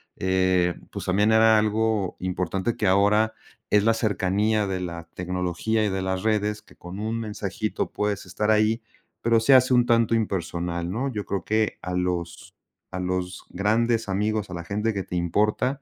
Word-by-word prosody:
eh, 95 Hz, -1 st, +2 dB, 0.2 s
pues, -, -, -6 dB
también 105 Hz, +4 st, +2 dB
era 110 Hz, 0 st, +6 dB
algo 110 Hz, -2 st, 0 dB
importante 95 Hz, +4 st, -2 dB
que 105 Hz, -, 0 dB
ahora 105 Hz, +3 st, +3 dB, 0.4 s
es 105 Hz, -1 st, +4 dB
la 115 Hz, +1 st, +4 dB
cercanía 105 Hz, 0 st, +1 dB
de 95 Hz, -1 st, -2 dB
la 85 Hz, -2 st, -6 dB
tecnología 90 Hz, +4 st, -1 dB
y -, -, +1 dB
de 95 Hz, 0 st, -2 dB
las 95 Hz, 0 st, -2 dB
redes, 105 Hz, -1 st, 0 dB
que -, -, -21 dB
con 90 Hz, +3 st, -9 dB
un 110 Hz, +2 st, -2 dB
mensajito 110 Hz, 0 st, -3 dB
puedes 105 Hz, -1 st, -2 dB
estar 105 Hz, +4 st, -2 dB
ahí, 110 Hz, +2 st, +3 dB, 0.4 s
pero 115 Hz, 0 st, +3 dB
se 135 Hz, +4 st, +5 dB
hace 130 Hz, 0 st, +5 dB
un 120 Hz, -1 st, +4 dB
tanto 115 Hz, -1 st, +3 dB
impersonal, 85 Hz, -4 st, -2 dB
¿no? 130 Hz, +8 st, -2 dB
Yo 105 Hz, -4 st, -4 dB
creo 95 Hz, -3 st, -3 dB
que 110 Hz, +2 st, 0 dB
a 90 Hz, -, -4 dB
los 90 Hz, -1 st, -3 dB, 0.4 s
a 90 Hz, -, -5 dB
los 90 Hz, 0 st, -3 dB
grandes 115 Hz, +3 st, +1 dB
amigos, 105 Hz, +1 st, -1 dB
a -, -, -7 dB
la 85 Hz, -1 st, -5 dB
gente 105 Hz, +4 st, -1 dB
que 100 Hz, -, -3 dB
te 90 Hz, -, -4 dB
importa, 105 Hz, -, 0 dB
105 Hz, 180 wpm, -25 LUFS, 90-110 Hz, 0.4 s, era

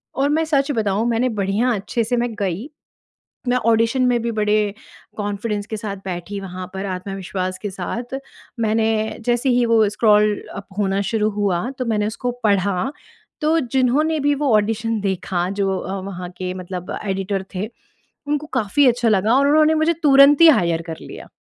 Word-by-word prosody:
और 275 Hz, +1 st, +1 dB
मैं 315 Hz, +2 st, +2 dB
सच 285 Hz, -2 st, +1 dB
बताऊँ 215 Hz, -3 st, 0 dB
मैंने 235 Hz, +2 st, +1 dB
बढ़िया 200 Hz, +6 st, +1 dB
अच्छे 215 Hz, +3 st, -2 dB
से 245 Hz, +2 st, 0 dB
मैं 240 Hz, +1 st, 0 dB
गई, 200 Hz, -, -2 dB, 0.8 s
मैं 245 Hz, 0 st, +3 dB
ऑडिशन 230 Hz, +2 st, +2 dB
में 245 Hz, -1 st, +2 dB
भी 235 Hz, 0 st, -2 dB
बड़े 210 Hz, -1 st, +1 dB, 0.4 s
कॉन्फ़िडेंस 205 Hz, 0 st, -3 dB
के 220 Hz, -, -4 dB
साथ 205 Hz, -2 st, -5 dB
बैठी 185 Hz, +2 st, -5 dB
वहाँ 185 Hz, -1 st, -7 dB
पर 190 Hz, +1 st, -4 dB
आत्मविश्वास 185 Hz, 0 st, -4 dB
के 205 Hz, -, -2 dB
साथ। 235 Hz, +7 st, -5 dB, 0.5 s
मैंने 220 Hz, 0 st, +1 dB
जैसे 240 Hz, +2 st, +1 dB
ही 245 Hz, -1 st, +3 dB
वो 225 Hz, -2 st, +4 dB
स्क्रॉल 210 Hz, 0 st, +3 dB, 0.2 s
अप 200 Hz, -, -8 dB
होना 195 Hz, -1 st, +1 dB
शुरू 215 Hz, -1 st, +1 dB
हुआ 200 Hz, +1 st, -1 dB
तो 255 Hz, -, -1 dB
मैंने 210 Hz, -2 st, 0 dB
उसको 245 Hz, +3 st, -3 dB
पढ़ा, 200 Hz, +2 st, +1 dB, 0.5 s
तो 315 Hz, +2 st, +3 dB
जिन्होंने 270 Hz, +4 st, +1 dB
भी 290 Hz, 0 st, +2 dB
वो 280 Hz, -2 st, 0 dB
ऑडिशन 220 Hz, +1 st, 0 dB
देखा 185 Hz, -2 st, -1 dB
जो 195 Hz, -1 st, -1 dB
अ, 195 Hz, +1 st, -4 dB
वहाँ 185 Hz, -2 st, -6 dB
के 185 Hz, 0 st, -3 dB
मतलब 180 Hz, -1 st, -6 dB
एडिटर 195 Hz, 0 st, -2 dB
थे 200 Hz, +4 st, -3 dB, 0.6 s
उनको 295 Hz, +1 st, -1 dB
काफ़ी 225 Hz, +7 st, +2 dB
अच्छा 240 Hz, -1 st, +2 dB
लगा 215 Hz, +2 st, +3 dB
और 280 Hz, +1 st, +3 dB
उन्होंने 310 Hz, +1 st, +4 dB
मुझे 315 Hz, +2 st, +2 dB
तुरंत 280 Hz, 0 st, +7 dB
ही 335 Hz, -, +10 dB
हायर 170 Hz, -, +3 dB
कर 160 Hz, -, -5 dB
लिया। -, -, -10 dB
215 Hz, 175 wpm, -21 LUFS, 195-245 Hz, 0.8 s, ही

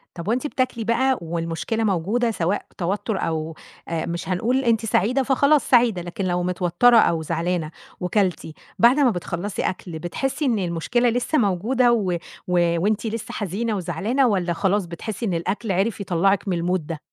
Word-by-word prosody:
طَب 170 Hz, 0 st, -7 dB
وأنتِ 250 Hz, +7 st, 0 dB
بتاكلي 255 Hz, -4 st, -1 dB
بقى 250 Hz, +4 st, +2 dB
والمشكلة 165 Hz, +6 st, -2 dB
موجودة 215 Hz, +5 st, +1 dB
سواء 185 Hz, 0 st, -1 dB
توتُّر 195 Hz, +3 st, -2 dB
أو 160 Hz, 0 st, -2 dB, 0.3 s
آآ، 165 Hz, -1 st, -2 dB
مش 170 Hz, +2 st, -4 dB
هنقول 240 Hz, +9 st, +1 dB
أنتِ 230 Hz, -2 st, +2 dB
سعيدة 245 Hz, +6 st, +2 dB
فخلاص 280 Hz, +3 st, +3 dB
سعيدة، 235 Hz, -7 st, +4 dB
لكن 175 Hz, +3 st, -4 dB
لو 180 Hz, -1 st, 0 dB
متوتَّرة 180 Hz, +6 st, +3 dB
أو 165 Hz, -6 st, +3 dB
زعلانة 165 Hz, 0 st, -2 dB, 0.3 s
وكلتِ، 180 Hz, -2 st, 0 dB, 0.3 s
بعد 245 Hz, +5 st, +5 dB
ما 270 Hz, -, +5 dB
بتخلّصي 175 Hz, +2 st, -4 dB
أكل 175 Hz, -3 st, -4 dB
بتحسّي 270 Hz, -, -2 dB
إن 235 Hz, -5 st, +1 dB
المشكلة 185 Hz, +8 st, 0 dB
لسّه 245 Hz, +6 st, 0 dB
موجودة 235 Hz, +5 st, +2 dB
و 205 Hz, -6 st, +1 dB, 0.4 s
و 170 Hz, -1 st, +2 dB
وأنتِ 215 Hz, +3 st, 0 dB
لسّه 225 Hz, 0 st, -4 dB
حزينة 210 Hz, +3 st, -2 dB
وزعلانة 205 Hz, +9 st, 0 dB
والّا 185 Hz, -5 st, 0 dB
خلاص 195 Hz, +2 st, +1 dB
بتحسّي 200 Hz, +7 st, -5 dB
إن 190 Hz, -, -1 dB
الأكل 190 Hz, +6 st, -2 dB
عرف 195 Hz, +3 st, 0 dB
يطلّعِك 195 Hz, +2 st, +1 dB
من 180 Hz, -, 0 dB
الmood 185 Hz, -1 st, +1 dB
ده؟ 165 Hz, -3 st, -5 dB
195 Hz, 165 wpm, -23 LUFS, 175-235 Hz, 0.4 s, بعد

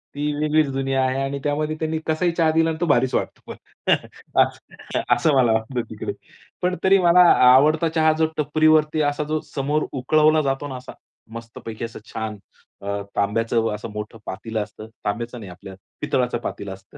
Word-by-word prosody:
ती 150 Hz, +1 st, -1 dB
वेगळीच 155 Hz, 0 st, +2 dB
दुनिया 135 Hz, 0 st, 0 dB
आहे 130 Hz, +1 st, 0 dB
आणि 135 Hz, +1 st, -2 dB
त्यामध्ये 150 Hz, +1 st, -1 dB
त्यांनी 160 Hz, 0 st, -1 dB
कसाही 170 Hz, +2 st, +1 dB
चहा 165 Hz, -1 st, +2 dB
दिला 165 Hz, +1 st, +2 dB
आणि 160 Hz, -, -3 dB
तो -, -, +2 dB
भारीच 130 Hz, -4 st, +2 dB
वाटतो, -, -, -4 dB, 0.9 s
असं -, -, -3 dB
असं 155 Hz, -, +2 dB
मला 125 Hz, -3 st, +4 dB
वाटतं 110 Hz, +3 st, -1 dB
तिकडे. -, -, -5 dB, 0.5 s
पण 180 Hz, 0 st, +1 dB
तरी 195 Hz, +1 st, +6 dB
मला 175 Hz, 0 st, +5 dB
आ 125 Hz, 0 st, +7 dB
आवडता 155 Hz, +4 st, +4 dB
चहा 155 Hz, 0 st, +4 dB, 0.3 s
टपरीवरती 155 Hz, +1 st, +3 dB
असा 145 Hz, 0 st, 0 dB
जो 155 Hz, -, +1 dB
समोर 145 Hz, +2 st, -1 dB
उकळवला 155 Hz, +4 st, +3 dB
जातो 135 Hz, +1 st, -2 dB
ना 130 Hz, -, -6 dB
असा 125 Hz, -, -10 dB, 0.4 s
मस्तपैकी 115 Hz, -1 st, -7 dB
असं 115 Hz, -, -9 dB
छान 110 Hz, -1 st, -4 dB, 0.4 s
अ, 100 Hz, 0 st, -3 dB
तांब्याचं 115 Hz, +2 st, 0 dB
असं 105 Hz, -, -7 dB
मोठं 105 Hz, +1 st, -6 dB
पातेलं 110 Hz, +3 st, -4 dB
असतं. 105 Hz, +1 st, -11 dB, 0.2 s
तांब्याचं 120 Hz, +4 st, -3 dB
नाही 100 Hz, -4 st, -9 dB
आपल्या 95 Hz, +2 st, -11 dB, 0.3 s
पितळाचं 125 Hz, -2 st, 0 dB
पातेलं 100 Hz, -4 st, -6 dB
असतं 95 Hz, +1 st, -15 dB
135 Hz, 170 wpm, -22 LUFS, 115-155 Hz, 0.9 s, आ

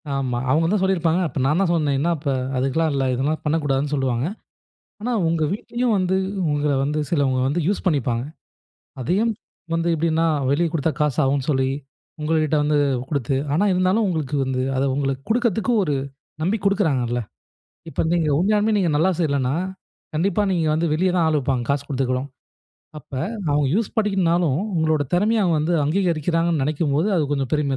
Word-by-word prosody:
ஆமா. 130 Hz, -3 st, -1 dB
அவங்க 155 Hz, +4 st, +3 dB
என்ன 205 Hz, +5 st, +2 dB
சொல்லியிருப்பாங்க, 180 Hz, -2 st, +1 dB
அப்ப 150 Hz, -, -5 dB
நான் 150 Hz, +6 st, +2 dB
தான் 180 Hz, -, +2 dB
சொன்னேன். 150 Hz, -4 st, +1 dB
என்னா 170 Hz, +4 st, +1 dB
இப்ப? 145 Hz, -1 st, -2 dB, 0.3 s
அதுக்கெல்லாம் 135 Hz, +5 st, +1 dB
இல்லை. 135 Hz, -1 st, 0 dB
இதெல்லாம் 145 Hz, +5 st, -1 dB
பண்ணக்கூடாதுன்னு 145 Hz, -2 st, 0 dB
சொல்லுவாங்க. 130 Hz, -2 st, 0 dB, 0.8 s
ஆனா 245 Hz, +3 st, -2 dB, 0.2 s
உங்க 165 Hz, -1 st, +1 dB
வீட்லயும் 235 Hz, +3 st, -1 dB
வந்து, 185 Hz, 0 st, +1 dB, 0.4 s
உங்கள 145 Hz, 0 st, +1 dB
வந்து 150 Hz, +2 st, -1 dB
சிலவங்க 135 Hz, -5 st, +1 dB
வந்து 165 Hz, +5 st, 0 dB
யூஸ் 200 Hz, -, -1 dB
பண்ணிப்பாங்க. 125 Hz, -7 st, +1 dB, 0.8 s
அதையும் 200 Hz, -, +1 dB, 0.4 s
வந்து 165 Hz, +1 st, 0 dB
எப்படீன்னா, 165 Hz, +1 st, +1 dB, 0.3 s
வெளிய 170 Hz, +4 st, +2 dB
குடுத்தா 160 Hz, 0 st, 0 dB
காசு 150 Hz, -3 st, +1 dB
ஆகும் 135 Hz, 0 st, 0 dB
சொல்லி, 130 Hz, -2 st, +1 dB, 0.5 s
உங்கள்கிட்ட 155 Hz, 0 st, +1 dB
வந்து 150 Hz, 0 st, +2 dB, 0.3 s
குடுத்து 140 Hz, -2 st, -1 dB, 0.2 s
ஆனா 170 Hz, +7 st, +2 dB
இருந்தாலும் 185 Hz, +4 st, +2 dB
உங்களுக்கு 155 Hz, -5 st, -2 dB
வந்து, 130 Hz, -1 st, -1 dB
அத 130 Hz, -, +1 dB
உங்களுக்கு 135 Hz, -1 st, -1 dB
குடுக்கறதுக்கு 235 Hz, 0 st, +1 dB
ஒரு 150 Hz, -5 st, 0 dB, 0.5 s
நம்பி 190 Hz, +7 st, +1 dB
குடுக்குறாங்கல்ல. 140 Hz, -, +1 dB, 0.7 s
இப்ப -, -, -1 dB
நீங்க 165 Hz, -3 st, +1 dB
உண்மையாலுமே 210 Hz, +4 st, +2 dB
நீங்க 180 Hz, -4 st, +1 dB
நல்லா 165 Hz, +5 st, +3 dB
செய்யலன்னா, 140 Hz, -5 st, 0 dB, 0.6 s
கண்டிப்பா 190 Hz, +5 st, +1 dB
நீங்க 170 Hz, -3 st, +1 dB
வந்து 165 Hz, +2 st, 0 dB
வெளிய 185 Hz, +4 st, +2 dB
தான் 170 Hz, -, +3 dB
ஆள் 155 Hz, -, +2 dB
வைப்பாங்க, 130 Hz, -3 st, -1 dB
காசு 140 Hz, 0 st, 0 dB
குடுத்துக்கூட. 130 Hz, -2 st, 0 dB, 0.8 s
அப்ப 140 Hz, -, -19 dB, 0.4 s
அவங்க 145 Hz, 0 st, +2 dB
யூஸ் 220 Hz, -1 st, 0 dB
பண்ணிக்கணும்னாலும், 175 Hz, -8 st, +2 dB, 0.2 s
உங்களோட 160 Hz, -2 st, +2 dB
திறமைய 210 Hz, +5 st, +2 dB
அவங்க 175 Hz, -4 st, +2 dB
வந்து 170 Hz, +3 st, 0 dB
அங்கீகரிக்கிறாங்கன்னு 165 Hz, -1 st, +1 dB
நெனைக்கும்போது, 150 Hz, +4 st, 0 dB
அது 160 Hz, -, +2 dB
கொஞ்சம் 135 Hz, -3 st, -1 dB
பெருமையா 145 Hz, -3 st, +1 dB
155 Hz, 160 wpm, -22 LUFS, 140-180 Hz, 0.8 s, அவங்க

